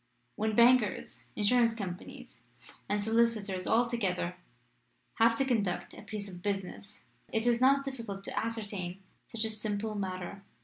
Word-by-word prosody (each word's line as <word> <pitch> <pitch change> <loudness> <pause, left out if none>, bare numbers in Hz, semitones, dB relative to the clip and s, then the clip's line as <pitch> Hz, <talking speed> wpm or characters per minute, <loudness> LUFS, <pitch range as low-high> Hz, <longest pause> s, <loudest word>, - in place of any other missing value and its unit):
When 215 0 0
bankers, 235 -3 +4
insurance 230 +2 +3
companies, 185 -5 -7 0.5
and 205 0 +1
solicitors 220 -4 +1
altogether 220 -7 +1 0.8
have 230 0 +6
to 270 - +2
conduct 210 -8 0
a - - -10
piece 210 -2 -6
of 180 -2 -9
business 200 +1 -4 0.3
it 225 +1 0
is 240 0 +3
not 275 +1 +5
difficult 230 -8 -5
to - - -6
ascertain 200 -5 -3 0.2
such 225 -1 -2
a - - 0
simple 215 0 -2
matter. 190 -1 -4
215 Hz, 135 wpm, -31 LUFS, 195-230 Hz, 0.8 s, have